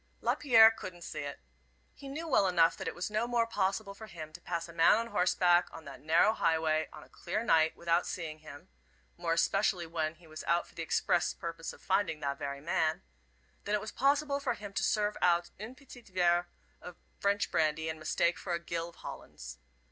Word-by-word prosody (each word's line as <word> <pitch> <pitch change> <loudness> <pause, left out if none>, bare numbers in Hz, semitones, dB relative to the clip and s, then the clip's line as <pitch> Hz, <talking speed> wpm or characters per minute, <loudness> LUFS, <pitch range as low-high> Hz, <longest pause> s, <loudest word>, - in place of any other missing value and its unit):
Lapierre 225 -5 +6
couldn't 185 -5 -9
see - - -6
it. 145 0 -5 0.5
He 275 - -11
knew 305 +5 -5
well 205 -10 +3
enough 170 -2 +4
that - - -6
it - - -3
was 180 +4 -4
no 215 +3 0
more 240 -1 +2
possible 200 -1 -1
for 220 +2 -11
him 155 -5 -9
to 175 - -11
pass 170 -1 -3
a 170 - -12
man 165 +3 +6
on 230 +1 -1
horseback 180 -2 +3
on 160 - -11
that 140 - -10
narrow 165 +8 +4
highway, 160 -4 +1
on - - -11
a - - -17
clear 215 +6 -4
night, 160 -7 +3
without 170 +1 +1
seeing 155 -3 -5
him 155 +3 -12 0.5
more 170 -1 -1
especially 185 +1 +1
when 160 -1 -2
he 170 +1 -20
was 155 0 -9
out 170 +1 +2
for - - -20
the - - -6
express 170 +1 +1
purpose 165 -1 -6
of - - -16
finding 185 -5 +1
that 140 -1 -3
very 140 0 -5
man 160 -1 0 0.6
than 205 - +1
it 210 - -1
was 215 - -6
possible 280 +1 +1
for 280 -2 -1
him 205 -1 -9
to - - -1
serve 210 -1 +1
out 175 -1 +2
un 220 +5 -7
petit 260 -2 -14
verre 175 -4 +1 0.3
of 180 - -9 0.2
French 200 0 +1
brandy 160 0 +1
in 160 0 -4
mistake 170 +2 0
for 180 - -4
a - - -3
gill 170 0 -4
of 170 - -18
Hollands. 60 0 -9
175 Hz, 210 wpm, -31 LUFS, 160-210 Hz, 0.6 s, Lapierre